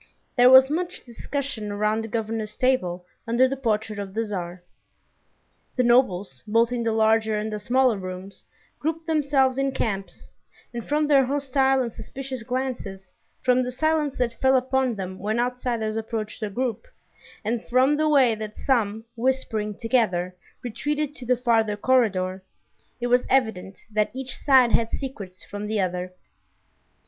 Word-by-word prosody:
There 245 0 +7
was 260 +1 +8
much 350 +3 -3
discussion 240 -3 -5
around 210 +2 0
the - - -5
governor's 220 -1 -3
table 185 -9 0 0.2
under 240 +3 +4
the 270 - -2
portrait 220 -4 -1
of 195 -1 -6
the 225 - +1
Tsar. 180 -3 -5 1.1
The 250 - +2
nobles, 235 -6 +2
both 230 +2 +3
in 245 -1 -1
the 230 -1 0
larger 220 0 +2
and 215 +1 -3
the 210 - -3
smaller 245 0 +2
rooms, 185 +1 -8 0.4
grouped 320 +2 -2
themselves 280 -4 +2
in 275 0 0
camps, 195 -7 -4 0.5
and 235 -1 -4
from 300 +4 +1
their 285 -2 +5
hostile 270 -1 +1
and 235 -2 -5
suspicious 265 -2 -7
glances, 235 -6 -4 0.3
from 255 0 +4
the 250 0 -2
silence 305 +1 0
that 235 -2 -2
fell 265 0 +5
upon 260 -1 0
them 185 -1 -6
when 215 +4 -1
outsiders 240 -3 -1
approached 225 -1 -4
a 215 - -2
group, 250 - -3 0.6
and 230 +1 -1
from 260 +4 +4
the 310 +1 +1
way 265 -6 +5
that 215 -1 -6
some, 225 -4 0
whispering 230 -4 -1
together, 195 -7 0 0.3
retreated 295 +5 -2
to 255 -5 -10
the 250 0 +3
farther 225 -4 +1
corridor, 200 -6 +1 0.6
it 240 - -2
was 245 +1 +2
evident 220 -7 0
that 210 0 +1
each 260 0 -6
side 260 -4 +4
had 230 -1 +2
secrets 200 -9 -6
from 205 +1 -6
the 215 0 -1
other. 180 -1 -2
235 Hz, 155 wpm, -24 LUFS, 210-260 Hz, 1.1 s, was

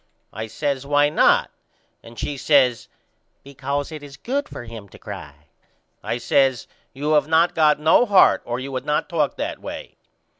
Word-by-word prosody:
I 110 +2 -5
says 140 +3 -3
Why 145 +1 +3
not? 150 - +3 0.5
And 115 0 -14
she 145 - -3
says 130 -4 +2 0.6
Because 140 +2 -4
it 155 -2 -7
is 140 -2 -12
good 280 - -3
for - - -8
him 115 -3 -10
to - - -15
cry. 75 0 -10 0.6
I - - -3
says 135 -2 +1 0.3
You 145 +3 -3
have 150 -1 +3
not 165 +2 +3
got 150 -2 +3
no 160 +10 +4
heart 200 -3 +5
or 120 +1 -4
you 135 +1 -6
would 130 - -4
not 150 0 -1
talk 155 -5 0
that - - -4
way. - - -8
140 Hz, 175 wpm, -22 LUFS, 125-150 Hz, 0.6 s, heart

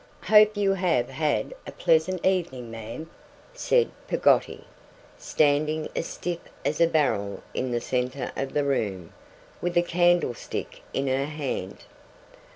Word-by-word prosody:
'Hope 215 0 +6
you 200 -1 +3
have 175 -10 +1
had 155 - -1
a - - -5
pleasant 165 +3 +1
evening, 165 -11 0
ma'am,' 115 +8 -7 0.5
said - - +2 0.2
Peggotty, - - +2 0.5
standing 155 +1 +1
as - - -2
stiff 175 -1 -4 0.3
as 150 +3 0
a 170 - +6
barrel 100 - 0
in 130 - -2
the 120 -1 -1
centre 125 +1 -2
of 135 0 -3
the 145 - +2
room, 100 -11 -2 0.5
with 175 0 -1
a 175 - +5
candlestick 175 -7 0
in 135 - -1
her 135 +1 +1
hand. 140 -10 -5
150 Hz, 135 wpm, -26 LUFS, 125-175 Hz, 0.5 s, Hope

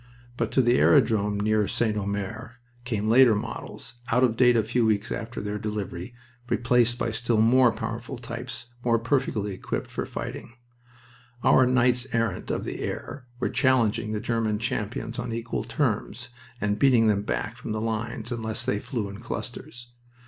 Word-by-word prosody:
But - - -1
to 130 - +4
the 120 +1 +4
airdrome 110 -7 +3
near 105 0 +2
St. 110 -3 0
Omer 100 +3 -4 0.3
came 110 -4 -1
later 120 0 +6
models, 120 +2 -6
out 125 +2 +3
of 120 -3 +3
date 125 0 +5
a 110 - +3
few 120 +3 +1
weeks 110 -2 +1
after 115 +1 -4
their 105 0 -3
delivery, 105 -1 -5 0.3
replaced 120 0 +2
by 120 -1 -1
still 115 0 0
more 120 +2 +5
powerful 115 +4 -5
types 120 +1 -7
more 115 -1 +3
perfectly 115 -4 0
equipped 95 - -4
for - - -3
fighting. - - -6 0.9
Our 130 - +5
knights 125 0 +3
errant 115 -5 -1
of - - -1
the - - -5
air 130 -3 -5
were - - 0
challenging 115 -5 +2
the 110 - -1
German 115 -1 0
champions 115 +3 -3
on 120 -1 -4
equal 115 0 -3
terms, 120 -2 -2 0.3
and 105 0 -1
beating 125 -4 +5
them 105 -2 +3
back 105 +2 -3
from 125 -2 -7
the 110 - -1
lines 115 +1 -3
unless 115 0 -2
they 105 - 0
flew 110 -2 -3
in 100 +1 -8
clusters. 120 +1 -7
115 Hz, 165 wpm, -26 LUFS, 110-120 Hz, 0.9 s, later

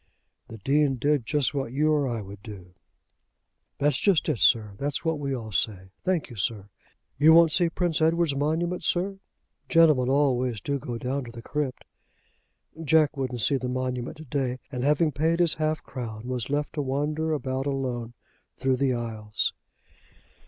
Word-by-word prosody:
"The 115 - -9
Dean 140 +5 +2
did 140 -1 0
just 145 -3 +1
what 135 -4 -2
you 150 +4 +2
or 145 -3 +2
I 115 -4 -3
would 100 0 -11
do." 95 -5 -11 1.0
"That's 145 -1 +1
just 195 -6 +3
it, 140 -7 0
sir. 110 -4 +4
That's 145 +3 -3
what 160 -2 0
we 140 -2 -2
all 110 -3 -7
say. 95 -2 -1
Thank 180 -7 -1
you, 120 - -10
sir. 100 0 -2 0.5
You 155 +2 +7
won't 165 -1 +7
see 170 +1 +3
Prince 170 -2 -1
Edward's 165 -2 +2
monument, 160 +5 -1
sir? 195 +2 0 0.5
Gentlemen 155 -7 +5
always 130 -4 +1
do 140 +7 -2
go 120 -1 -5
down 130 +3 -3
to 120 - -9
the 115 0 -10
crypt." 145 -3 -3 1.0
Jack 155 -1 +3
wouldn't 130 -3 -2
see 140 - +3
the 125 -1 -4
monument 125 +2 -3
to 160 - -10
day, 130 -2 -2
and 125 -2 -3
having 150 +2 +3
paid 160 +5 +1
his 170 -2 +5
half 155 0 0
crown, 115 -3 -7
was 125 -2 -3
left 145 +1 -1
to 150 - -2
wander 150 +4 -1
about 135 -2 -2
alone 125 -4 -3 0.4
through 130 -1 +1
the 130 -1 +1
aisles. 110 -3 -2
135 Hz, 175 wpm, -26 LUFS, 120-155 Hz, 1.0 s, You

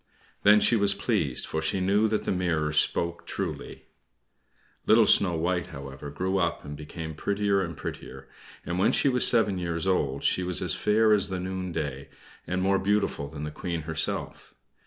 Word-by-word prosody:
Then 105 +1 +6
she 120 - +4
was 100 -2 +3
pleased, 100 - -1
for 80 - -3
she 80 +4 -1
knew 100 +4 +2
that 110 0 -1
the - - -2
mirror 85 -5 0
spoke 85 +3 0
truly. - - -5 1.0
Little - - +6
Snow 90 -4 +4
White, 85 +2 -1
however, 70 +1 -9
grew 95 +6 -2
up, 85 -4 -1
and 75 0 -7
became 80 +2 -7
prettier 100 +4 0
and 85 -4 -5
prettier, - - -8 0.4
and 90 +2 -3
when 95 - +3
she 140 - +3
was 125 -1 +4
seven 105 -5 +3
years 85 -1 -3
old 70 -8 0
she - - +2
was 90 -1 0
as - - -1
fair 110 +1 +3
as 100 -1 +2
the 95 -1 -3
noonday, 85 -7 -4 0.4
and 95 +1 -1
more 95 0 +2
beautiful 100 -7 0
than 75 +1 -8
the 75 - -4
Queen 85 0 -4
herself. 80 0 -3
90 Hz, 180 wpm, -27 LUFS, 80-100 Hz, 1.0 s, Then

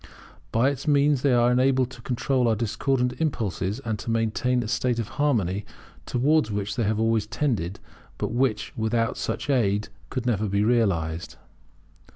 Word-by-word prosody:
By 125 +5 +3
its 140 +2 -7
means 145 -2 +3
they 140 - +3
are 120 0 +4
enabled 130 0 +2
to 120 - -11
control 125 +1 0
our 115 - +3
discordant 125 +3 0
impulses, 110 - -1
and 110 -2 -2
to 115 - -6
maintain 115 +2 +1
a - - -5
state 125 +1 0
of 115 -3 -3
harmony 105 -9 +1 0.4
towards 140 0 +2
which 100 -1 -3
they 115 - 0
have 110 +1 0
always 110 -2 +1
tended, 110 - -1 0.4
but - - -2
which, 120 -1 0
without 115 +1 0
such - - -3
aid, 105 -7 +1 0.2
could 130 -2 -3
never 110 -3 +1
be 100 +1 +1
realized. 85 -9 0
115 Hz, 165 wpm, -25 LUFS, 105-130 Hz, 0.4 s, are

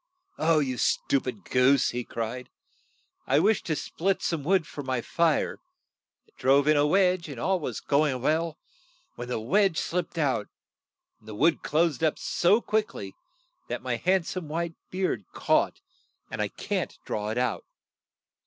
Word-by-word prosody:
'You 150 -6 +2
stu 140 - +2
pid 115 -7 -6
goose!" 125 +2 +3
he 125 0 -3
cried. 115 +2 -5 0.8
"I 135 - +3
wished 205 +7 +2
to 160 - +1
split 190 +5 -1
some 165 -4 -1
wood 180 +1 +2
for 145 - -7
my 130 -2 -1
fire. 165 +5 +1 0.7
I - - -28
drove 140 +2 +4
in 155 - +5
a 145 0 +4
wedge, 180 -1 +2
and 135 -5 -7
all 190 +7 +1
was 150 - -4
go 150 +2 +2
ing 135 - -1
on 125 - -7
well, 160 +2 0 0.6
when 120 - -7
the 125 -2 -2
wedge 180 - +2
slipped 180 0 -2
out, 135 -9 0 0.7
and 110 - -23
the 110 - -7
wood 160 +8 +3
closed 160 -1 +1
up 155 - +2
so 205 +7 +2
quick 215 -1 -1
ly 95 -1 -6 0.6
that - - -4
my 125 -2 -1
hand 185 +4 +2
some 180 -3 -5
white 165 +2 -2 0.2
beard 185 - -1
caught, - - +1 0.5
and - - -3
I - - +1
can't - - -3
draw 105 0 -3
it 110 - -3
out. 125 -2 0
150 Hz, 170 wpm, -27 LUFS, 125-170 Hz, 0.8 s, in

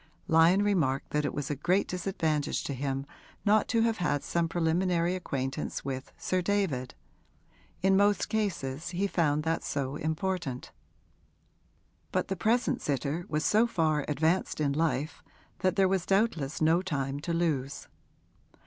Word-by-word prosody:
Lyon 165 +5 +5
remarked 155 -10 +1
that 150 0 0
it - - -2
was 145 0 -3
a - - -1
great 180 +8 +1
disadvantage 165 -5 -1
to 140 - -3
him 135 +1 -2 0.4
not 210 0 +4
to 230 - +2
have 225 -1 +2
had 145 -7 0
some 170 -1 0
preliminary 170 +1 +1
acquaintance 135 -9 -3
with 130 -1 -4
Sir 185 0 0
David 170 -10 -1 0.9
in 190 0 +5
most 205 +1 +3
cases 170 -9 -2
he 185 +3 -1
found 155 -6 +1
that 165 +1 -1
so 140 0 -2
important. 160 -4 -3 1.4
But - - -1
the 195 - 0
present 225 +7 +1
sitter 145 +4 -2
was 150 0 -1
so 220 +3 +4
far 155 -8 +1
advanced 160 +5 0
in 145 -2 +1
life 155 -1 -1 0.4
that 185 -1 +1
there 195 -2 +4
was 185 -1 0
doubtless 185 -9 +1
no 165 +3 +4
time 140 -6 -2
to 165 +3 -4
lose. 155 -5 -1
165 Hz, 150 wpm, -29 LUFS, 145-190 Hz, 1.4 s, Lyon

